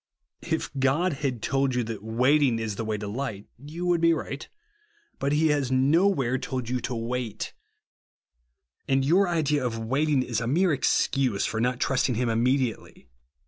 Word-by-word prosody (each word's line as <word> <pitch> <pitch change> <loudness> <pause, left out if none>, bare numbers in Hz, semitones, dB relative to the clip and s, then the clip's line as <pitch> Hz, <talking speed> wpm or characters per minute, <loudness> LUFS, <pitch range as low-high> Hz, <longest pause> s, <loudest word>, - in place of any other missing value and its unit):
If - - -1
God 145 +7 +2
had 130 -6 -2
told 135 -2 +1
yon 125 -2 0
that 110 -3 -6
wait 125 +7 +2
ing 125 -5 +2
is 110 -2 -3
the 115 - -3
way 110 -1 -2
to 105 0 -6
light, 110 -2 -4
you 155 +6 -6
would 175 -2 +2
bo 165 0 +5
right. 150 -2 -5 0.7
But 140 - 0
he 155 +2 +3
has 145 -3 0
nowhere 135 -1 +2
told 130 -2 -4
you 125 0 0
to 125 - -4
wait; 115 -1 -4 1.3
and 135 0 +2
your 180 +7 +4
idea 150 -5 +1
of 120 -2 -2
waiting 135 +4 +1
is 120 -3 -2
a 115 - -2
mere 170 +6 +2
excuse 130 -5 +1
for 110 - -2
not 125 +1 0
trusting 130 -2 +1
him 120 +1 0
immediately. 120 - -1
130 Hz, 175 wpm, -26 LUFS, 115-145 Hz, 1.3 s, bo